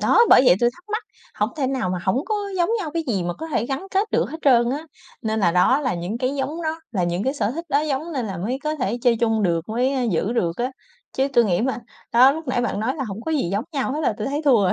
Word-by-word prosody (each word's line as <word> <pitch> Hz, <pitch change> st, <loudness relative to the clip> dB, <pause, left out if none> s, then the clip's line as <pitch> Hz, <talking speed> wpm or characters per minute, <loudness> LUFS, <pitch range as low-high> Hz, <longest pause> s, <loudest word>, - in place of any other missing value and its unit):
đó, -, -, +3 dB
bởi -, -, +8 dB
vậy 175 Hz, -, +8 dB
tôi 240 Hz, 0 st, +4 dB
thắc 350 Hz, +7 st, -20 dB
mắc, 435 Hz, -, -1 dB, 0.3 s
hổng 210 Hz, +2 st, 0 dB
thể 275 Hz, -, 0 dB
nào 255 Hz, -9 st, -1 dB
mà 180 Hz, -, -1 dB
hổng 245 Hz, -, 0 dB
có 430 Hz, -, -1 dB, 0.2 s
giống 345 Hz, -1 st, +2 dB
nhau 325 Hz, -7 st, -4 dB
cái 335 Hz, -, 0 dB
gì 200 Hz, -7 st, 0 dB
mà 175 Hz, 0 st, -2 dB
có 320 Hz, -, -7 dB
thể 270 Hz, -6 st, -1 dB
gắn 270 Hz, +8 st, -4 dB
kết 395 Hz, +3 st, 0 dB
được -, -, +1 dB
hết -, -, -5 dB
trơn 240 Hz, -3 st, +4 dB
á. 295 Hz, +4 st, -3 dB, 0.4 s
Nên 220 Hz, 0 st, -1 dB
là 175 Hz, -, +4 dB
đó 215 Hz, +10 st, +4 dB
là 260 Hz, -7 st, -1 dB
những 175 Hz, +6 st, -4 dB
cái 255 Hz, +2 st, -1 dB
giống 290 Hz, +5 st, -3 dB
nó, 320 Hz, +1 st, -2 dB
là 185 Hz, -4 st, +1 dB
những 175 Hz, +2 st, -1 dB
cái 265 Hz, -, +1 dB
sở 220 Hz, -7 st, 0 dB
thích 330 Hz, +7 st, -5 dB
đó 285 Hz, -1 st, +2 dB
giống 305 Hz, +2 st, -2 dB
nên 250 Hz, -5 st, -2 dB
là 195 Hz, -, -5 dB
mới 230 Hz, +9 st, -2 dB
có 305 Hz, 0 st, 0 dB
thể 240 Hz, -3 st, -1 dB
chơi 240 Hz, -2 st, +4 dB
chung 225 Hz, -2 st, +2 dB
được, 170 Hz, -2 st, 0 dB
mới, 250 Hz, +5 st, 0 dB
ơ, 260 Hz, -, 0 dB
giữ 190 Hz, +5 st, 0 dB
được 175 Hz, -8 st, 0 dB
á. 250 Hz, +2 st, -1 dB, 0.4 s
Chứ 270 Hz, +1 st, +1 dB
tôi 240 Hz, -2 st, +5 dB
nghĩ 180 Hz, -5 st, +1 dB
mà 250 Hz, 0 st, -1 dB, 0.3 s
đó 255 Hz, +3 st, +7 dB
lúc 315 Hz, -2 st, -7 dB
nãy 255 Hz, -, +1 dB
bạn 235 Hz, -4 st, -2 dB
nói 245 Hz, +5 st, 0 dB
là 270 Hz, -, -2 dB
hổng 205 Hz, 0 st, -6 dB
có 320 Hz, -, -2 dB
gì 275 Hz, -, 0 dB
giống 205 Hz, +4 st, -1 dB
nhau 270 Hz, -2 st, -1 dB
hết 300 Hz, -, -2 dB
là 280 Hz, -, +1 dB
tôi 215 Hz, -, -3 dB
thấy 290 Hz, +3 st, -2 dB
thua 245 Hz, -8 st, +5 dB
rồi, 185 Hz, -, +3 dB
255 Hz, 300 wpm, -22 LUFS, 210-285 Hz, 0.4 s, bởi